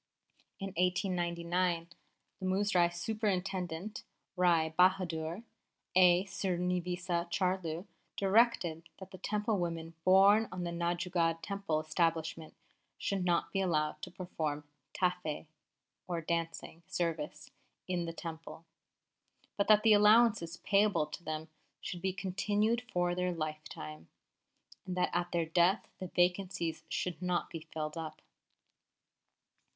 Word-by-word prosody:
In 195 -1 -4
1899, 175 -1 0 0.5
the 185 - -5
Muzrai 185 -2 +3
Superintendent, 190 -1 -2 0.3
Rai 170 -3 +3
Bahadur 180 +1 +2 0.5
A. 180 0 +6
Sreenivasa 180 -2 -1
Charlu, 180 -2 -1 0.3
directed 190 -6 +2
that 190 -1 -11
the 185 - -10
Temple 210 +1 0
women 165 -1 -3
borne 195 +4 +6
on 180 -1 -4
the 170 - -2
Nanjangud 170 -1 0
Temple 200 -6 -1
establishment 160 0 -1 0.4
should 195 -2 -1
not 175 -1 +1
be 195 - +1
allowed 155 -4 0
to - - -6
perform 155 -5 -4 0.3
tafe 180 -4 -1 0.6
(or 175 -2 -1
dancing) 165 0 -3
service 155 -3 -3 0.4
in 180 -2 -1
the 165 - -4
Temple; 165 0 -8 0.9
but 200 - +1
that 215 -1 +6
the 220 -1 +7
allowances 210 -5 +5
payable 200 -6 +3
to 150 +3 -9
them 155 0 -4 0.3
should 175 - -6
be 190 +1 0
continued 205 +4 0
for 175 0 +1
their 180 0 0
lifetime, 155 - -6 0.8
and 180 0 -3
that 180 - +1
at 175 0 0
their 170 -2 +1
death 175 +5 +3
the 185 - -4
vacancies 175 -2 0
should 180 +1 -2
not 180 -1 -1
be 165 - -5
filled 155 0 -4
up. 160 -1 -7
175 Hz, 120 wpm, -33 LUFS, 165-190 Hz, 0.9 s, the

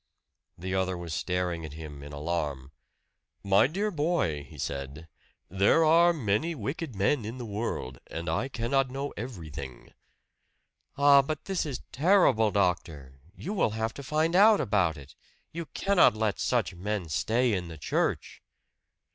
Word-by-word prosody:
The 95 +2 -4
other 95 -1 0
was 85 -2 -6
staring 90 -1 -2
at 75 -2 -7
him 75 -2 -9
in 75 +1 -9
alarm. 75 -3 -3 0.7
"My 100 +4 +4
dear 200 +8 -2
boy," 150 - 0
he - - -14
said, 70 +3 -5 0.4
"there 100 - +3
are 170 +2 +6
many 150 +2 -1
wicked 135 +2 -5
men 110 +7 +1
in 115 +4 -6
the 125 - -6
world, 100 - -4
and 85 +1 -6
I 80 +11 0
cannot 130 +1 0
know 135 +2 -4
everything." 80 - -8 1.0
"Ah, 140 0 +7
but 155 +2 -5
this 190 -5 -1
is 135 -4 -5
terrible, 150 - +4
doctor! 80 -9 -1 0.2
You 195 - -5
will 190 - +2
have 110 0 -1
to - - -8
find 155 +5 0
out 210 +2 +7
about 90 -6 +1
it 70 0 -13 0.4
you 165 -1 -6
cannot 195 - +3
let 110 -1 -1
such 120 -6 0
men 95 0 -3
stay 115 +9 +1
in 90 -3 -2
the 80 -1 -9
church." 75 - -2
105 Hz, 155 wpm, -28 LUFS, -, 1.0 s, Ah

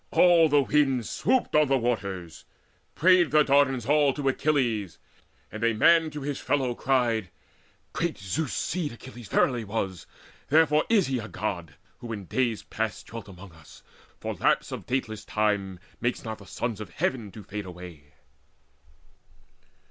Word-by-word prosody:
All 170 -3 +5
the 145 -1 +4
winds 135 -5 +1
Swooped 255 +2 0
on 150 -1 +5
the 135 0 +3
waters. 100 -9 -3 0.5
Prayed 180 -1 +5
the 150 0 +5
Dardans 135 -4 +2
all 145 -1 +4
To 145 -2 -2
Achilles, 125 - 0 0.5
and 110 +1 -6
a 115 -1 +2
man 165 +7 +5
to 150 -1 -7
his 140 0 -3
fellow 130 -4 0
cried: 120 -6 0 0.6
"Great - - -2
Zeus's 120 +10 -3
seed 160 -5 -2
Achilles 120 -2 -11
verily 120 -3 +1
was; 95 -4 -4 0.4
Therefore 150 0 +4
is 215 -6 +4
he 130 -2 -1
a 110 - -6
God, 85 -8 -4 0.2
who 120 -2 -7
in 100 -3 -5
days 120 +2 -1
past 110 -2 -4
Dwelt 115 -1 -9
among 95 0 -12
us; 80 -2 -17 0.4
for - - -4
lapse - - +1
of - - -7
dateless 110 -5 -2
time 100 -3 -1 0.2
Makes 120 +1 -1
not 110 -1 -6
the 100 - -14
sons 115 -1 -4
of 105 - -7
Heaven 110 +5 -2
to 105 - -10
fade 105 -1 -6
away." 85 -5 -11
120 Hz, 155 wpm, -27 LUFS, 100-145 Hz, 0.6 s, All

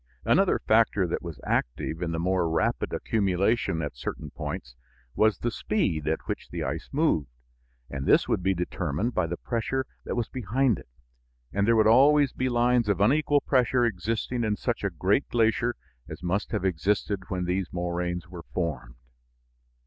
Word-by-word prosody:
Another - - +4
factor 110 -3 +3
that 85 - -2
was 85 -6 -7
active 80 +7 -1
in 85 -2 -1
the 80 - -2
more 90 0 +1
rapid 80 0 0
accumulation 100 -3 0
at 70 -4 -4
certain - - -6
points 65 -1 -6 0.4
was 110 -1 +3
the 120 - -2
speed 85 -9 -1
at 80 +1 0
which - - -5
the - - -4
ice - - -4
moved, 140 - +1 0.6
and 70 -2 -5
this - - +5
would - - 0
be 95 +1 +1
determined 90 - -2
by 90 -2 +1
the 85 +1 -4
pressure 130 +3 -2 0.2
that - - -3
was 120 -2 -1
behind 125 0 0
it, - - -14 0.7
and 100 +1 +1
there 115 - +5
would 110 -1 +4
always 140 +5 +5
be 130 0 -1
lines 120 -2 +2
of 100 -2 +1
unequal 145 +6 +3
pressure 125 -2 +2
existing 115 +3 -2
in 105 -2 +1
such 120 +1 -2
a 100 - +1
great 95 - 0
glacier 115 +1 +2 0.3
as - - -8
must 95 +4 -1
have 105 -4 -1
existed 95 +2 0
when 90 -1 -2
these 90 +1 -1
moraines 90 0 -3
were 90 -1 -10
formed. 75 -9 -3
100 Hz, 170 wpm, -27 LUFS, 85-120 Hz, 0.7 s, this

